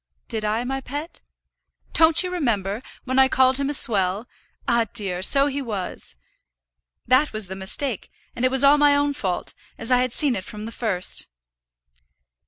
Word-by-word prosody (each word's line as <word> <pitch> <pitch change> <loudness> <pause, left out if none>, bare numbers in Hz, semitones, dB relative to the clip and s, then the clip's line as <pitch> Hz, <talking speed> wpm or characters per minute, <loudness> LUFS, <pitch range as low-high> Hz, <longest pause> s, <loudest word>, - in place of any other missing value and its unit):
"Did 220 -2 -3
I, 215 +3 -1
my 270 +2 -3
pet?" 290 +6 -7 0.7
"Don't 325 +2 +4
you 365 - -4
remember, 220 - -1 0.2
when 260 0 0
I 265 - +6
called 260 0 +3
him 280 0 -1
a - - -1
swell? 200 -3 +3 0.4
Ah, 235 -1 +2
dear! 185 -4 -1
so 275 +8 +4
he 285 0 -2
was. 205 - -6 0.9
That 255 +5 +3
was 215 -4 -3
the 190 - -5
mistake, 195 +5 -3 0.3
and 240 - -4
it 255 - +4
was 265 +1 +4
all 285 +1 +6
my 290 -1 +5
own 285 0 +1
fault, 190 -10 -3 0.2
as 225 - -4
I 250 - +5
had 250 0 0
seen 275 0 +1
it 190 - -4
from 210 +1 -9
the 225 - -7
first." 210 -7 -2
250 Hz, 180 wpm, -22 LUFS, 210-280 Hz, 0.9 s, I